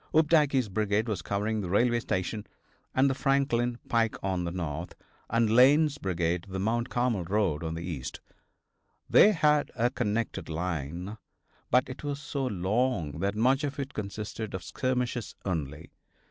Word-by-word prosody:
Opdycke's 150 Hz, -5 st, +4 dB
brigade 105 Hz, +2 st, 0 dB
was 105 Hz, -6 st, -2 dB
covering 105 Hz, +4 st, -1 dB
the 90 Hz, -, -4 dB
railway 120 Hz, +5 st, +3 dB
station 105 Hz, 0 st, -3 dB, 0.5 s
and 130 Hz, +1 st, +5 dB
the 135 Hz, -, +2 dB
Franklin 130 Hz, -3 st, +1 dB
pike 115 Hz, -2 st, +1 dB
on 95 Hz, -2 st, -1 dB
the 85 Hz, -, -2 dB
north, 85 Hz, -1 st, -4 dB, 0.3 s
and 115 Hz, 0 st, +3 dB
Lane's 140 Hz, +6 st, +5 dB
brigade 85 Hz, -1 st, -1 dB
the 95 Hz, -, -4 dB
Mount 115 Hz, +5 st, 0 dB
Carmel 120 Hz, -6 st, 0 dB
road 95 Hz, -4 st, 0 dB
on 80 Hz, 0 st, -3 dB
the 85 Hz, -, -5 dB
east. 70 Hz, -7 st, -5 dB, 0.9 s
They 210 Hz, -, +7 dB
had 150 Hz, -5 st, +3 dB
a 120 Hz, 0 st, +1 dB
connected 115 Hz, -6 st, -2 dB
line, 85 Hz, +4 st, -4 dB, 0.5 s
but 125 Hz, +1 st, +3 dB
it 130 Hz, +2 st, -8 dB
was 145 Hz, -1 st, -3 dB
so 140 Hz, -2 st, -3 dB
long 95 Hz, -, 0 dB
that 100 Hz, +3 st, 0 dB
much 130 Hz, +6 st, +3 dB
of 140 Hz, -1 st, -3 dB
it 140 Hz, +1 st, -4 dB
consisted 105 Hz, 0 st, -5 dB
of 95 Hz, -, -5 dB
skirmishers 125 Hz, -2 st, -2 dB
only. 80 Hz, -4 st, -3 dB
110 Hz, 155 wpm, -29 LUFS, 90-130 Hz, 0.9 s, They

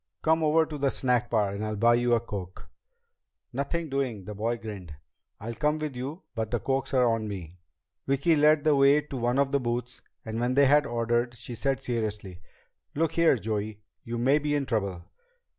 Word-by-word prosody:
"Come 160 Hz, 0 st, +3 dB
over 160 Hz, +1 st, +4 dB
to 150 Hz, -2 st, -7 dB
the 140 Hz, 0 st, +2 dB
snack 125 Hz, -3 st, 0 dB
bar 105 Hz, -4 st, +1 dB
and 100 Hz, +1 st, -4 dB
I'll 110 Hz, 0 st, -2 dB
buy 115 Hz, +3 st, +4 dB
you 120 Hz, 0 st, +3 dB
a -, -, +2 dB
coke." 100 Hz, -5 st, -8 dB, 0.9 s
"Nothing 160 Hz, +6 st, -2 dB
doing!" 130 Hz, -8 st, -2 dB
The 105 Hz, -, -6 dB
boy 115 Hz, +3 st, -1 dB
grinned. 100 Hz, -9 st, -8 dB, 0.4 s
"I'll 115 Hz, +3 st, -5 dB
come 150 Hz, +5 st, 0 dB
with 155 Hz, -3 st, -4 dB
you, 140 Hz, +9 st, -6 dB
but 110 Hz, -3 st, -3 dB
the 120 Hz, -, -1 dB
cokes 135 Hz, +1 st, -1 dB
are 125 Hz, -1 st, +5 dB
on 115 Hz, -2 st, 0 dB
me." 90 Hz, -4 st, -7 dB, 0.5 s
Vicki 140 Hz, +5 st, +3 dB
led 150 Hz, 0 st, +4 dB
the 155 Hz, -2 st, +4 dB
way 140 Hz, +2 st, +5 dB
to 145 Hz, -2 st, -7 dB
one 120 Hz, +1 st, 0 dB
of 140 Hz, -1 st, +2 dB
the 140 Hz, -, +2 dB
booths, 120 Hz, 0 st, -3 dB, 0.2 s
and 110 Hz, 0 st, -4 dB
when 125 Hz, +2 st, 0 dB
they 140 Hz, 0 st, +6 dB
had 145 Hz, +2 st, +4 dB
ordered, 120 Hz, +1 st, 0 dB
she 120 Hz, +1 st, -8 dB
said 135 Hz, +3 st, -1 dB
seriously, 105 Hz, -6 st, -3 dB, 0.5 s
"Look 160 Hz, +1 st, +1 dB
here, 165 Hz, -4 st, +4 dB
Joey. 105 Hz, -2 st, -4 dB, 0.2 s
You 120 Hz, 0 st, -4 dB
may 135 Hz, +5 st, +3 dB
be 150 Hz, 0 st, -1 dB
in 140 Hz, -1 st, 0 dB
trouble." 100 Hz, -7 st, -2 dB
120 Hz, 200 wpm, -27 LUFS, 110-140 Hz, 0.9 s, they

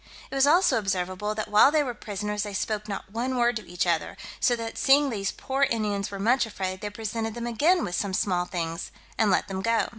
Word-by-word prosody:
It -, -, -8 dB
was 270 Hz, +1 st, +4 dB
also 345 Hz, -4 st, +4 dB
observable, 195 Hz, +1 st, -2 dB
that 215 Hz, -, -3 dB
while 210 Hz, +5 st, +6 dB
they 305 Hz, -1 st, +3 dB
were 250 Hz, -3 st, -3 dB
prisoners, 210 Hz, -1 st, -4 dB
they 205 Hz, -1 st, -4 dB
spoke 210 Hz, +1 st, -2 dB
not 195 Hz, -1 st, -6 dB
one 250 Hz, +4 st, -2 dB
word 240 Hz, 0 st, +2 dB
to 215 Hz, -, -9 dB
each 175 Hz, 0 st, -1 dB
other; 170 Hz, -2 st, -1 dB, 0.2 s
so 245 Hz, -, +3 dB
that 230 Hz, -1 st, -5 dB
seeing 280 Hz, 0 st, +4 dB
these 200 Hz, -3 st, -2 dB
poor 270 Hz, +1 st, -4 dB
Indians 215 Hz, -7 st, 0 dB
were 200 Hz, -, -6 dB
much 235 Hz, +4 st, +2 dB
afraid, 190 Hz, -3 st, -4 dB
they 210 Hz, -, -3 dB
presented 220 Hz, +1 st, -4 dB
them 235 Hz, 0 st, -4 dB
again 310 Hz, +10 st, +2 dB
with 175 Hz, -, -4 dB
some 190 Hz, +1 st, -1 dB
small 180 Hz, -3 st, +1 dB
things, 165 Hz, -2 st, -4 dB, 0.3 s
and 220 Hz, -, +2 dB
let 185 Hz, -, +2 dB
them 190 Hz, -1 st, -4 dB
go. 230 Hz, +2 st, +1 dB
215 Hz, 230 wpm, -26 LUFS, 195-240 Hz, 0.3 s, while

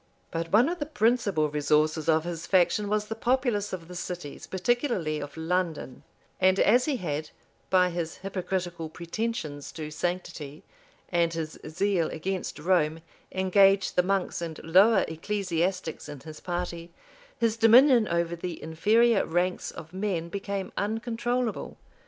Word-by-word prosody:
But 165 Hz, 0 st, -3 dB
one 230 Hz, +6 st, +5 dB
of 350 Hz, +2 st, -2 dB
the 290 Hz, -, -3 dB
principal 220 Hz, -, +2 dB
resources 150 Hz, +2 st, +1 dB
of 160 Hz, 0 st, +4 dB
his 170 Hz, -1 st, -5 dB
faction 190 Hz, +2 st, +3 dB
was 210 Hz, 0 st, +1 dB
the 220 Hz, -, -4 dB
populace 235 Hz, -3 st, 0 dB
of 170 Hz, -3 st, -6 dB
the 180 Hz, -, -9 dB
cities, 175 Hz, -4 st, -6 dB
particularly 190 Hz, -, 0 dB
of 145 Hz, +2 st, -8 dB
London; 165 Hz, -5 st, -2 dB, 0.4 s
and 190 Hz, +1 st, +4 dB
as 245 Hz, +4 st, +5 dB
he 290 Hz, -4 st, 0 dB
had, 155 Hz, -5 st, -3 dB, 0.4 s
by 180 Hz, -1 st, +4 dB
his 170 Hz, -1 st, -3 dB
hypocritical 180 Hz, -3 st, -3 dB
pretensions 170 Hz, -3 st, -4 dB
to 155 Hz, -2 st, -6 dB
sanctity, 155 Hz, -3 st, -4 dB, 0.5 s
and 170 Hz, -2 st, +2 dB
his 160 Hz, -1 st, -5 dB
zeal 175 Hz, +1 st, 0 dB
against 185 Hz, +3 st, -4 dB
Rome, 160 Hz, -1 st, +1 dB, 0.3 s
engaged 195 Hz, +1 st, +3 dB
the 180 Hz, -, +5 dB
monks 190 Hz, -1 st, -1 dB
and 165 Hz, -2 st, -5 dB
lower 190 Hz, +5 st, +5 dB
ecclesiastics 175 Hz, -1 st, -2 dB
in 145 Hz, -2 st, -7 dB
his 155 Hz, -1 st, -10 dB
party, 175 Hz, -1 st, -4 dB, 0.5 s
his 230 Hz, -1 st, +1 dB
dominion 235 Hz, +1 st, +6 dB
over 170 Hz, 0 st, 0 dB
the 170 Hz, 0 st, -5 dB
inferior 210 Hz, +8 st, +3 dB
ranks 180 Hz, +2 st, -1 dB
of 160 Hz, +2 st, -10 dB
men 185 Hz, -4 st, -2 dB
became 200 Hz, 0 st, -4 dB
uncontrollable. 230 Hz, +2 st, -2 dB
180 Hz, 140 wpm, -27 LUFS, 165-210 Hz, 0.5 s, dominion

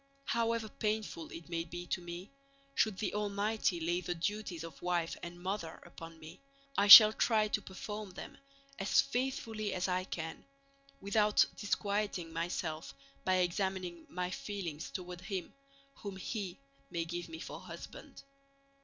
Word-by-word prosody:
However 230 Hz, -2 st, +1 dB
painful 210 Hz, -6 st, -2 dB
it 165 Hz, 0 st, -8 dB
may 170 Hz, -1 st, -2 dB
be 175 Hz, +1 st, -7 dB
to 175 Hz, -, -2 dB
me, 175 Hz, +4 st, -7 dB, 0.4 s
should 215 Hz, -7 st, +2 dB
the 210 Hz, -, -2 dB
Almighty 205 Hz, -2 st, 0 dB
lay 175 Hz, +2 st, 0 dB
the 175 Hz, 0 st, -2 dB
duties 180 Hz, -1 st, -2 dB
of 165 Hz, -, -9 dB
wife 175 Hz, -2 st, 0 dB
and 170 Hz, 0 st, -7 dB
mother 185 Hz, -3 st, -3 dB
upon 165 Hz, -1 st, -10 dB
me 160 Hz, +3 st, -11 dB, 0.3 s
I 200 Hz, -, +3 dB
shall 215 Hz, +1 st, +13 dB
try 220 Hz, -2 st, +3 dB
to -, -, 0 dB
perform 210 Hz, +2 st, -6 dB
them 185 Hz, -, -9 dB, 0.4 s
as 195 Hz, -, +3 dB
faithfully 230 Hz, -6 st, 0 dB
as 180 Hz, -, 0 dB
I 185 Hz, 0 st, 0 dB
can, 160 Hz, -3 st, -5 dB, 0.6 s
without 210 Hz, +1 st, +4 dB
disquieting 200 Hz, -5 st, -1 dB
myself 160 Hz, -4 st, -3 dB, 0.3 s
by 185 Hz, -, +3 dB
examining 180 Hz, -1 st, -1 dB
my 180 Hz, 0 st, -2 dB
feelings 180 Hz, -7 st, -4 dB
toward 180 Hz, -2 st, -6 dB
him 190 Hz, -4 st, -4 dB, 0.4 s
whom 200 Hz, -2 st, -6 dB
He 190 Hz, -1 st, -4 dB, 0.3 s
may 170 Hz, -1 st, -2 dB
give 175 Hz, +1 st, -5 dB
me 160 Hz, -, -6 dB
for -, -, -7 dB
husband. -, -, -10 dB
185 Hz, 145 wpm, -34 LUFS, 170-210 Hz, 0.6 s, shall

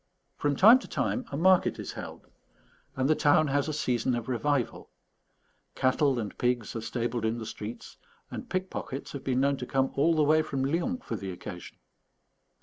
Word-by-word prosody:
From 145 Hz, -1 st, 0 dB
time 225 Hz, -, +8 dB
to -, -, -11 dB
time 255 Hz, -, -1 dB
a 140 Hz, -, -3 dB
market 185 Hz, +3 st, +4 dB
is -, -, -6 dB
held, -, -, -8 dB, 0.7 s
and 130 Hz, 0 st, +1 dB
the 155 Hz, -, +5 dB
town 150 Hz, 0 st, +3 dB
has 140 Hz, +1 st, +1 dB
a -, -, -1 dB
season 125 Hz, -4 st, 0 dB
of 120 Hz, -2 st, -4 dB
revival; 130 Hz, +1 st, -1 dB, 0.9 s
cattle 130 Hz, +1 st, +2 dB
and 110 Hz, -4 st, -4 dB
pigs 120 Hz, -3 st, 0 dB
are 115 Hz, -, -3 dB
stabled 120 Hz, 0 st, -2 dB
in 110 Hz, +1 st, 0 dB
the 115 Hz, -, -6 dB
streets; 110 Hz, +1 st, -8 dB, 0.3 s
and -, -, -7 dB
pickpockets 185 Hz, -7 st, -4 dB
have 140 Hz, -, -7 dB
been 130 Hz, -1 st, +1 dB
known 140 Hz, 0 st, +2 dB
to 125 Hz, -, -6 dB
come 135 Hz, -1 st, +1 dB
all 160 Hz, +4 st, +3 dB
the 155 Hz, -, +3 dB
way 155 Hz, +2 st, +4 dB
from 135 Hz, -4 st, -2 dB
Lyons 180 Hz, -, -1 dB
for -, -, -3 dB
the 95 Hz, -, -5 dB
occasion. 90 Hz, 0 st, -9 dB
135 Hz, 185 wpm, -28 LUFS, 120-155 Hz, 0.9 s, time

